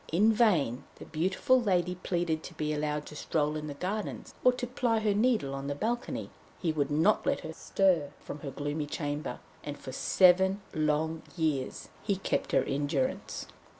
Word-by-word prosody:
In 210 +7 +5
vain 160 - +3
the - - -10
beautiful 190 +10 +2
lady 180 -5 +2
pleaded 175 -3 -1
to 170 - -10
be 155 -1 -1
allowed 150 0 -1
to 150 - -10
stroll 150 0 0
in 155 0 -4
the 145 - -5
gardens, 195 +7 -4
or 250 - +7
to 250 - -3
ply 245 -2 +1
her 215 -2 +2
needle 215 - +2
on 135 0 -4
the 145 - -2
balcony; 235 - -2 0.3
he 170 - +1
would 145 -3 0
not 160 +8 +3
let - - +1
her 160 - -6
stir 175 -4 +2
from 150 - -7
her 140 - -5
gloomy 145 +2 -3
chamber, 145 0 -3 0.3
and 145 -1 -5
for 130 - -8
seven 190 +7 +4
long 155 +1 +1 0.2
years 150 -5 -1
he 200 -2 0
kept 190 - -1
her - - +4
in 145 +1 -1
durance. 260 - -1
160 Hz, 185 wpm, -30 LUFS, 150-200 Hz, 0.3 s, or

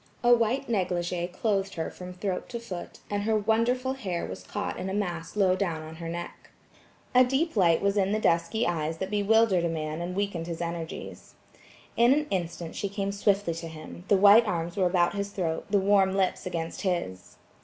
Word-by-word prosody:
A 240 0 +6
white 240 +4 +1
negligé 180 -4 -1
clothed 195 0 -1
her 160 -1 -3
from 180 0 -9
throat 185 0 -3
to 235 - -4
foot, 190 -7 -8
and 205 0 -2
her 220 +1 +1
wonderful 235 +5 +1
hair 190 -10 -3
was - - -7
caught 205 0 -4
in 190 - -3
a 190 - -2
mass 175 -5 -3
low 190 -3 +3
down 170 -5 -2
on 160 +1 -9
her 165 -1 -6
neck. 175 +1 -7 0.6
A 255 0 +7
deep 270 +6 0
light 170 -4 +3
was 200 +1 +2
in 195 0 +2
the 215 - +1
dusky 170 +4 +1
eyes 160 -2 -1
that 190 +3 -4
bewildered 210 -2 +3
a 170 - +1
man 155 0 -3
and 180 +1 -4
weakened 195 -4 -2
his 170 -1 -5
energies. 170 -1 -6 0.6
In 235 +3 +5
an 300 +1 0
instant 175 -3 -3
she 200 - -2
came 200 0 -2
swiftly 200 -3 +1
to 165 +1 -6
him–the 165 +5 -2
white 205 +4 +7
arms 170 -2 -2
were 190 -3 +2
about 175 0 +2
his 200 0 -3
throat, 170 -5 -3
the 205 - +3
warm 195 -1 +3
lips 190 -1 0
against 165 -2 -4
his. 170 - -3
190 Hz, 195 wpm, -27 LUFS, 170-205 Hz, 0.6 s, A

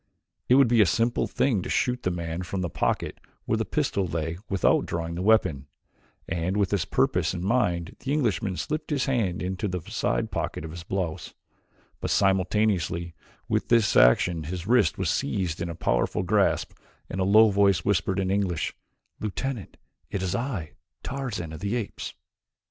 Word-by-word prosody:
It 125 - +7
would 135 -1 +6
be 115 -1 +4
a 100 - +5
simple 115 +8 +1
thing 120 -8 +1
to - - -6
shoot 125 0 0
the - - 0
man 85 -1 -3
from 95 +1 -3
the 85 -3 -3
pocket - - -1 0.3
where - - +1
the - - 0
pistol 95 -2 0
lay 80 +1 -3
without 95 -3 +2
drawing 85 0 -3
the 85 - -4
weapon, 95 -10 +2 0.6
and 90 +3 -1
with 100 -3 +1
this 100 - +1
purpose - - +1
in 90 +1 -4
mind 95 -7 0
the 135 - -4
Englishman 110 -9 0
slipped 155 +1 -3
his 145 -3 0
hands 110 -11 0
into 95 +2 -2
the 90 -1 -2
side - - 0
pocket - - -3
of 80 - -7
his 85 +1 -7
blouse, 90 -2 -4 0.6
but - - -3
simultaneously 95 -3 +1 0.3
with - - 0
this 115 -5 +3
action 80 +7 +4
his 90 +2 -5
wrist 125 +4 +3
was 95 -4 0
seized 95 - -1
in 85 - -2
a 85 - -5
powerful - - 0
grasp - - +2 0.4
and 95 - -3
a - - +3
low 105 +3 +6
voice 100 -4 +3
whispered 95 -1 +1
in 95 -1 0
English: 95 -5 0 0.5
"Lieutenant, 110 +1 -4 0.3
it 95 - -3
is 90 0 -1
I, 110 - -3 0.3
Tarzan 120 - -4
of 80 - -7
the 100 +6 -2
Apes." 115 -5 -4
95 Hz, 175 wpm, -26 LUFS, 85-110 Hz, 0.6 s, It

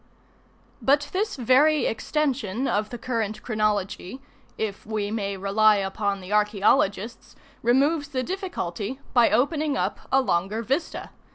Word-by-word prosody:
But 285 +2 +2
this 420 +3 -1
very 280 +4 +4
extension 260 -3 -1
of 210 +1 0
the 240 - -6
current 225 -3 -3
chronology, 215 0 -1 0.4
if 215 -3 -3
we 210 -1 -3
may 200 -3 -2
rely 210 +3 +4
upon 200 0 -2
the 185 +3 -6
archaeologists, 210 +1 +1 0.3
removes 285 +6 +2
the 260 -3 -2
difficulty 265 - -4
by 240 -3 +5
opening 295 +2 +1
up - - -1
a 270 - +5
longer 210 -2 0
vista. 275 +8 -2
225 Hz, 125 wpm, -25 LUFS, 205-275 Hz, 0.4 s, by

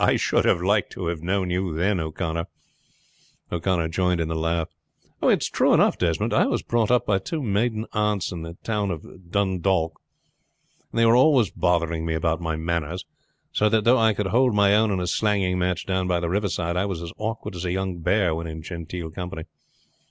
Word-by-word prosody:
"I - - +4
should - - +1
have 85 - +2
liked 100 +2 +2
to 95 - -5
have 85 -2 -4
known 90 +1 -1
you 90 -2 -1
then, 95 +3 +1
O'Connor." 85 +1 -3 1.0
O'Connor 85 -1 0
joined 90 +1 +1
in 80 -1 -1
the 80 - -2
laugh. 80 0 0 0.5
"It's - - +3
true - - +3
though, - - +5
Desmond. - - -1
I - - +4
was - - -1
brought 115 -2 +1
up 125 0 +3
by 95 -2 +2
two 150 - -4
maiden 110 +1 0
aunts 105 -4 0
in 85 -3 -5
the 85 +1 -8
town 105 -3 -1
of 85 +1 -8
Dundalk, 95 -3 0 0.9
and - - -7
they 115 - +5
were 115 +1 +5
always 125 - +4
bothering 85 -2 0
me 80 -1 -1
about 80 +1 0
my 80 -1 -2
manners; 85 +1 -3 0.5
so 105 - +2
that 110 0 +2
though 120 +3 +5
I 110 -2 +3
could 105 - -1
hold 125 -2 +3
my 100 -1 +4
own 110 +1 +3
in 95 -2 0
a 90 - -2
slanging 95 -1 +1
match 90 -1 -1
down 95 -1 -1
by 90 -1 +1
the 85 -1 -2
riverside, 90 -4 -1
I 95 +3 +1
was 90 -4 -4
as 85 - -7
awkward 110 -2 -4
as 85 - -5
a 90 - -1
young 95 -1 -2
bear 90 0 +2
when 85 +1 -4
in 80 0 -7
genteel 85 -1 -6
company. 90 -1 -6
90 Hz, 205 wpm, -24 LUFS, 85-105 Hz, 1.0 s, though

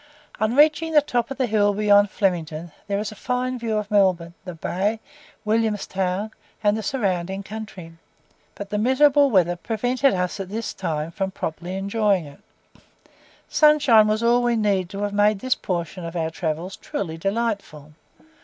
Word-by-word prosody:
On 220 +2 +1
reaching 310 +2 +4
the 300 - +7
top 240 -5 -1
of 270 - -6
the 260 - +1
hill 205 -3 +2
beyond 205 -1 +4
Flemington 170 -5 -2 0.2
there 200 0 -1
is 210 +1 -3
a - - -10
fine 250 +3 -2
view 225 -2 -1
of 210 -1 -4
Melbourne, 185 -4 +2
the 180 -2 -7
bay, 200 +7 -1 0.5
William's 215 -1 +1
Town, 190 +3 -2 0.3
and 205 0 +3
the 220 - -3
surrounding 195 -5 -2
country, 200 -5 -8 0.6
but 200 -1 -8
the 210 - 0
miserable 280 +4 +4
weather 175 -6 +3
prevented 245 +6 0
us 180 +1 -2
at 190 -1 -5
this 225 +2 -4
time 160 -3 -3
from 195 +2 -2
properly 175 0 -5
enjoying 200 -2 +1
it. 145 -1 -13 1.1
Sunshine 285 -8 +5
was 215 +2 0
all 240 +1 +4
we 240 -1 +1
needed 200 -5 +1
to 200 0 -5
have 205 0 -2
made 205 +1 +3
this 255 +6 0
portion 175 0 -4
of 165 +1 -6
our 160 -1 -1
travels 165 +2 -3
truly 165 -5 -5
delightful. 195 -7 -3
205 Hz, 170 wpm, -23 LUFS, 180-230 Hz, 1.1 s, the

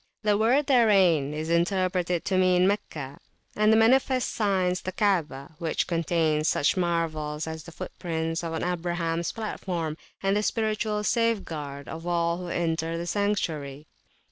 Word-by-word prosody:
The 210 -1 +3
word 240 +7 +3
therein 195 - +4
is 155 +2 -3
interpreted 180 0 +1
to 190 - 0
mean 185 0 +4
Meccah; 150 -9 -3 0.4
and 215 +1 +4
the 220 - +5
manifest 255 +3 +3
signs 185 -4 +1
the 185 - -4
Kaabah, 170 -8 0
which 165 -3 -1
contains 165 -2 +1
such 145 - +2
marvels 160 -4 -1
as 160 -1 -6
the 170 - -10
foot - - -7
prints 165 -1 -2
on 165 -1 -3
Abrahams 170 -1 -1
platform 175 -7 -4 0.3
and 195 +1 +2
the 210 - +2
spiritual 215 -1 -1
safeguard 165 - -1
of 165 +2 -7
all 170 -1 +1
who 180 0 -6
enter 165 -1 -1
the 170 - -4
Sanctuary. 160 -8 -2
175 Hz, 145 wpm, -26 LUFS, 160-205 Hz, 0.4 s, the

